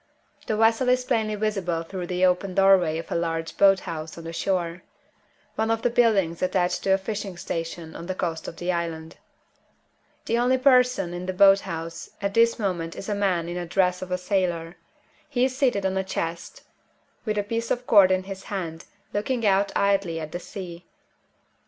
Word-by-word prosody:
The 215 Hz, -, 0 dB
vessel 225 Hz, +3 st, +3 dB
is 250 Hz, 0 st, +2 dB
plainly 220 Hz, -4 st, 0 dB
visible 195 Hz, -6 st, -1 dB
through 180 Hz, +1 st, -6 dB
the 180 Hz, +1 st, +1 dB
open 180 Hz, +1 st, +1 dB
doorway 190 Hz, -5 st, +4 dB
of 165 Hz, -, -7 dB
a -, -, -1 dB
large 165 Hz, -1 st, -2 dB
boat 195 Hz, -1 st, +5 dB
house 160 Hz, -2 st, -6 dB
on 165 Hz, -, -8 dB
the 165 Hz, 0 st, -7 dB
shore 175 Hz, -1 st, -1 dB, 0.7 s
one 220 Hz, 0 st, -1 dB
of 225 Hz, 0 st, 0 dB
the 245 Hz, -, +2 dB
buildings 205 Hz, -9 st, +2 dB
attached 180 Hz, -1 st, +1 dB
to 190 Hz, 0 st, +4 dB
a -, -, 0 dB
fishing 195 Hz, -2 st, -5 dB
station 165 Hz, -1 st, -5 dB
on 170 Hz, -, -8 dB
the 185 Hz, -, -3 dB
coast 165 Hz, -3 st, -3 dB
of -, -, -6 dB
the 175 Hz, +2 st, -2 dB
island. 165 Hz, -2 st, -4 dB, 1.1 s
The 230 Hz, -, +1 dB
only 250 Hz, +2 st, +3 dB
person 250 Hz, -8 st, +3 dB
in 175 Hz, +1 st, -5 dB
the 185 Hz, -, -1 dB
boat 195 Hz, +1 st, +6 dB
house 165 Hz, -1 st, -6 dB
at 200 Hz, 0 st, -2 dB
this 230 Hz, +1 st, +4 dB
moment 175 Hz, -6 st, -2 dB
is 195 Hz, -, -7 dB
a -, -, +1 dB
man 190 Hz, -5 st, 0 dB
in 175 Hz, -, -4 dB
the 175 Hz, -1 st, -4 dB
dress 180 Hz, 0 st, +1 dB
of 185 Hz, 0 st, -7 dB
a 180 Hz, -, +1 dB
sailor. 180 Hz, -3 st, -1 dB, 0.5 s
He 255 Hz, -3 st, +2 dB
is 260 Hz, -1 st, -2 dB
seated 245 Hz, -8 st, +1 dB
on 190 Hz, 0 st, 0 dB
a 190 Hz, -, 0 dB
chest, 170 Hz, -3 st, -5 dB, 0.6 s
with 215 Hz, -2 st, -2 dB
a 205 Hz, -, +1 dB
piece 230 Hz, +2 st, -3 dB
of 245 Hz, 0 st, -1 dB
cord 200 Hz, -5 st, +6 dB
in 185 Hz, 0 st, +1 dB
his 195 Hz, 0 st, -8 dB
hand, 170 Hz, -5 st, -5 dB, 0.3 s
looking 230 Hz, +3 st, -1 dB
out 200 Hz, 0 st, +3 dB
idly 195 Hz, -4 st, +1 dB
at 155 Hz, -1 st, -6 dB
the 175 Hz, -, -4 dB
sea. 180 Hz, -3 st, -9 dB
190 Hz, 195 wpm, -25 LUFS, 170-210 Hz, 1.1 s, boat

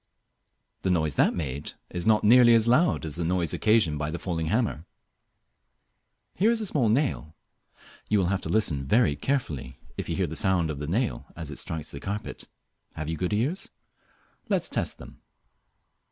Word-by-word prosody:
The 95 Hz, -, -1 dB
noise 80 Hz, -5 st, +1 dB
that -, -, +3 dB
made 70 Hz, -3 st, -4 dB, 0.2 s
is 90 Hz, +2 st, -3 dB
not 110 Hz, -1 st, +4 dB
nearly 120 Hz, +2 st, +7 dB
as 115 Hz, 0 st, +3 dB
loud 140 Hz, -, +3 dB
as 80 Hz, 0 st, -5 dB
the 85 Hz, -, -1 dB
noise 85 Hz, -1 st, 0 dB
occasioned 105 Hz, -9 st, +2 dB
by 75 Hz, 0 st, -2 dB
the 80 Hz, -, -3 dB
falling 85 Hz, -2 st, -3 dB
hammer. 105 Hz, -5 st, -1 dB, 1.5 s
Here 205 Hz, +6 st, +2 dB
is 235 Hz, -1 st, +2 dB
a 220 Hz, -, -2 dB
small 135 Hz, -, +1 dB
nail. 110 Hz, -, 0 dB, 0.7 s
You 105 Hz, -, +3 dB
will 95 Hz, -, +2 dB
have 100 Hz, -, -1 dB
to -, -, -5 dB
listen 80 Hz, -11 st, +1 dB
very 80 Hz, -, +3 dB
carefully 75 Hz, -, -3 dB, 0.2 s
if -, -, -4 dB
you -, -, -1 dB
hear 95 Hz, -, +1 dB
the 80 Hz, 0 st, -6 dB
sound 90 Hz, -3 st, +1 dB
of 70 Hz, -, -6 dB
the 75 Hz, -, -4 dB
nail 115 Hz, +9 st, -1 dB
as 80 Hz, -3 st, -7 dB
it 70 Hz, -, -6 dB
strikes 80 Hz, -2 st, -4 dB
the 70 Hz, -, -7 dB
carpet. 100 Hz, +6 st, -5 dB, 0.5 s
Have 80 Hz, 0 st, -4 dB
you -, -, -2 dB
good 90 Hz, +2 st, -2 dB
ears? 130 Hz, -, -1 dB, 0.8 s
Let -, -, +2 dB
us -, -, -2 dB
test -, -, -2 dB
them. -, -, -13 dB
90 Hz, 185 wpm, -27 LUFS, 80-115 Hz, 1.5 s, nearly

